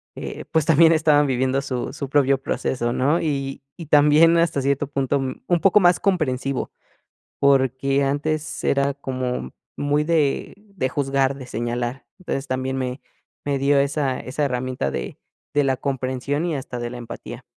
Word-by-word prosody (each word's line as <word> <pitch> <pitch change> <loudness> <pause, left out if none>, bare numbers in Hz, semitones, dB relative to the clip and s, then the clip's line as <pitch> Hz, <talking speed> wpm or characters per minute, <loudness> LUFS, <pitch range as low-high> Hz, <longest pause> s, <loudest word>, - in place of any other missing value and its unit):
eh, - - -6
pues, 160 -2 +2
también 165 +1 +6
estaban 150 -2 +4
viviendo 130 +1 +1
su 130 -2 -4
su 140 -3 -5
propio 140 -2 +3
proceso, 120 -3 -2
¿no? 145 +7 +1
Y 135 -4 -2 0.2
y 165 - -7
también, 150 +3 +5
hasta 165 -5 +1
cierto 140 +1 0
punto, 140 -1 0
mm, 130 -1 -4
un 175 -1 +2
poco 195 +1 +5
más 175 -2 +4
comprensivo, 140 -8 -1 0.7
porque 135 0 +2
antes 150 +3 -2
era 140 0 +2
como 130 - -4 0.2
muy 145 +1 0
de 155 -4 +1 0.2
de 130 -9 0
juzgar, 135 0 0
de 130 -2 -9
señalar. 120 +2 -3
Entonces, 140 -6 -4
también 130 +1 -2
me 130 +1 -3 0.4
me 140 -1 0
dio 140 +1 +3
esa 140 -2 0
esa 145 +3 -2
herramienta 125 - -2
de 65 -1 -5 0.4
de 145 - +3
la 135 -1 +2
comprensión 135 +3 -2
y 165 -4 -1
hasta 125 -2 -5
de 120 0 -3
la 125 - -7
empatía. 120 -1 -8
140 Hz, 165 wpm, -22 LUFS, 130-150 Hz, 0.7 s, también